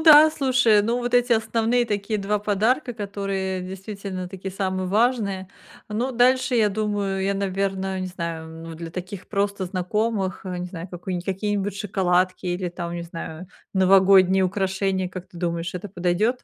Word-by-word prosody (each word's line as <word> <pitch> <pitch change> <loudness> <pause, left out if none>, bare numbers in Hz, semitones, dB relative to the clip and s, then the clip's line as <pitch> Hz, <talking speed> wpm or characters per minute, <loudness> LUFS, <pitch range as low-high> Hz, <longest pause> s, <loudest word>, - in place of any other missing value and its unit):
да, 310 -1 +9
слушай, 250 -7 +4
ну, 235 +3 0
вот 245 0 -3
эти 245 0 +4
основные 225 +2 +2
такие 205 0 -1
2 210 +2 0
подарка, 220 +6 +1
которые 195 -3 -3
действительно 190 0 -6
такие 190 0 -6
самые 185 -1 -1
важные. 200 -3 +1 0.4
Ну, 235 +5 -1
дальше 250 +1 +3
я 220 -3 +4
думаю, 205 -2 -1
я, 200 +1 +1
наверное, 195 -1 -1
не 185 - -2
знаю, 170 -3 -4 0.2
м, 165 - -7
для 165 0 -7
таких 185 +2 -7
просто 200 -1 0
знакомых, 195 +1 -1
э, 180 -1 -3
не 180 - -3
знаю, 175 0 -7
какую-ни 180 0 -4
какие-нибудь 200 +2 -2
шоколадки 185 -2 +1
или 180 0 -1
там, 170 0 -5
не 170 - -4
знаю, 170 +1 -7 0.3
новогодние 190 0 +6
украшения, 190 0 0
как 185 0 -8
ты 175 - -15
думаешь, 170 0 -2
это 185 +3 -5
подойдет? 185 +7 0
195 Hz, 160 wpm, -24 LUFS, 185-215 Hz, 0.4 s, да